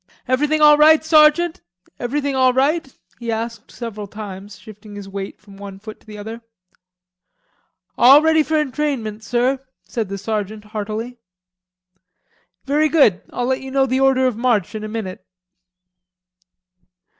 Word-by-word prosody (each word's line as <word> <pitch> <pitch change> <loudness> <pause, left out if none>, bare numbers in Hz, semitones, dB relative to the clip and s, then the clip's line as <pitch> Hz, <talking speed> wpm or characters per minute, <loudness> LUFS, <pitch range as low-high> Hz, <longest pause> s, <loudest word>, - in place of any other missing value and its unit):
"Everything 295 +4 +1
all 300 0 +7
right, 315 +1 +6
sergeant? 315 +2 +4 0.4
Everything 280 +3 -2
all 260 -1 +3
right?" 275 +2 +1 0.3
he 235 -1 -4
asked 225 0 -5
several 215 -4 -7
times, 200 -1 -9
shifting 210 0 -13
his 200 -1 -8
weight 195 0 -7
from 200 -2 -16
one 200 -1 -9
foot 215 +2 -11
to - - -29
the 210 -1 -10
other. 220 +3 -8 1.6
"All 270 +4 +8
ready 320 0 +4
for 315 +1 -1
entrainment, 270 -7 -2
sir," 250 +3 0 0.2
said 225 -6 -4
the 200 - -4
sergeant 210 +1 -4
heartily. 215 +3 -5 1.5
"Very 300 +3 +2
good, 270 - +4
I'll 245 - -2
let 260 +1 -1
you 265 - -8
know 270 0 +2
the 260 0 0
order 265 -1 +3
of 255 -3 +1
march 230 -5 0
in 215 -1 -5
a - - -4
minute." 215 -4 -6
240 Hz, 145 wpm, -20 LUFS, 210-275 Hz, 1.6 s, All